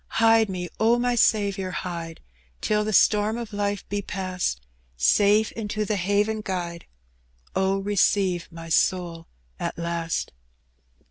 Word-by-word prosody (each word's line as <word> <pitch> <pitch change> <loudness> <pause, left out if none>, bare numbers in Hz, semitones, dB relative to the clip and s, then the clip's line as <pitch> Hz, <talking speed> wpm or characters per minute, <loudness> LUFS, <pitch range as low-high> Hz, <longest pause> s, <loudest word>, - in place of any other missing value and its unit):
Hide 225 -1 +5
me, 180 -2 -4
Q 230 +2 +4
my 245 0 +1
Saviour, 200 -5 +2
hide, 170 -3 -5 0.4
Till 210 0 +1
the 215 - -2
storm 210 +2 +3
of 230 -2 -6
life 205 0 -2
be 205 0 -2
past; 185 - -3 0.4
Safe 205 - +4
into 215 -1 -3
the 210 - 0
haven 205 +3 0
guide:.. 175 -4 -4 0.7
Oh, 190 +1 +2
receive 195 -3 +1
my 165 0 -9
soul 170 -1 +1 0.3
at - - -3
last." 170 -1 -2
200 Hz, 130 wpm, -25 LUFS, 175-210 Hz, 0.7 s, Hide